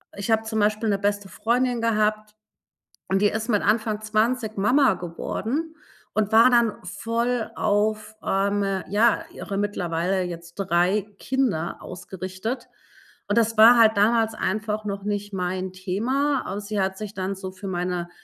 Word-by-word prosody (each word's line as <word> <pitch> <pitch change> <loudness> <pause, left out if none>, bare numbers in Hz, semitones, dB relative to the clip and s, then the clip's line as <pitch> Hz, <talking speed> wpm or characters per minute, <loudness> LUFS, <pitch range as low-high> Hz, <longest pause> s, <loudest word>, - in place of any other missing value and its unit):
Ich 200 +2 -5
habe 220 0 +3
zum 220 0 -2
Beispiel 215 +1 +1
'ne 200 -1 +1
beste 205 0 -1
Freundin 245 +2 0
gehabt 215 -1 0 0.7
und 195 +1 +2
die 205 - +5
ist 220 +3 -3
mit 210 -3 +3
Anfang 215 0 +1
20 220 +1 0
Mama 250 +4 +4
geworden 225 - -4 0.4
und 215 -1 0
war 225 +3 +7
dann 235 -3 +3
voll 230 +5 -2
auf, 215 +1 0
ähm, 195 -1 0
ja, 215 +3 +2
ihre 195 - -5
mittlerweile 185 -2 -1
jetzt 170 -1 -7
3 190 +2 +1
Kinder 240 -12 -1
ausgerichtet. 185 +6 -6 0.6
Und 205 +3 0
das 225 -1 +2
war 230 +3 +9
halt 220 -2 +5
damals 225 +1 +3
einfach 215 +1 -2
noch 200 -1 -4
nicht 205 0 -3
mein 185 0 -3
Thema. 250 +10 0
Aber 200 +2 -4
sie 205 0 -3
hat 190 0 -1
sich 210 -1 -6
dann 190 0 -3
so 190 -1 -7
für 190 +2 -9
meine 180 -1 -2
210 Hz, 155 wpm, -24 LUFS, 190-225 Hz, 0.7 s, war